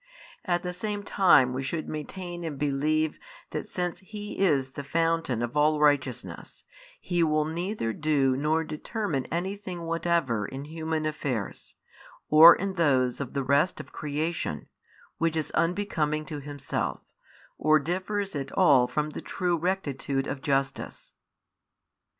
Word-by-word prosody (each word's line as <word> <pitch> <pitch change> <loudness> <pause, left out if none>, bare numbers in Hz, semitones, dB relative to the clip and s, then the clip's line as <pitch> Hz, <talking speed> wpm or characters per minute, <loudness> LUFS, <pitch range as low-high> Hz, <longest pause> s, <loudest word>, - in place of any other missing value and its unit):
At 175 -2 0
the 180 0 -3
same 205 +2 -3
time 160 -11 +5
we 130 - -2
should 155 +4 -3
maintain 175 +3 -6
and 155 -4 -4
believe 150 +2 0 0.3
that - - -4
since 180 -1 -3
He 210 +1 -8
is 140 -9 +2
the 140 - -6
fountain 165 -5 0
of 120 +2 -4
all 150 +1 +3
righteousness, 130 - 0 0.4
He 175 -1 -1
will 155 -2 +2
neither 170 - -2
do 140 -3 +2
nor 155 +4 +1
determine 155 - -3
anything 185 0 -3
whatever 165 -10 0
in 135 +2 -7
human 160 0 -3
affairs, 135 -8 -4 0.5
or 160 +3 +10
in 195 0 -3
those 135 -8 +2
of 135 - -5
the 140 - -1
rest 140 +6 +2
of - - -9
creation, 150 - -3 0.5
which 165 -1 +1
is 155 -2 -2
unbecoming 160 -3 0
to 150 -2 -5
Himself, 145 -1 -4 0.6
or 155 +1 +5
differs 185 +5 -2
at 140 -2 -4
all 140 -9 +5
from 150 +4 -2
the - - -6
true 180 -2 -1
rectitude 145 -6 -1
of 140 -1 -4
justice. 135 -2 -2
155 Hz, 140 wpm, -27 LUFS, 140-175 Hz, 0.6 s, or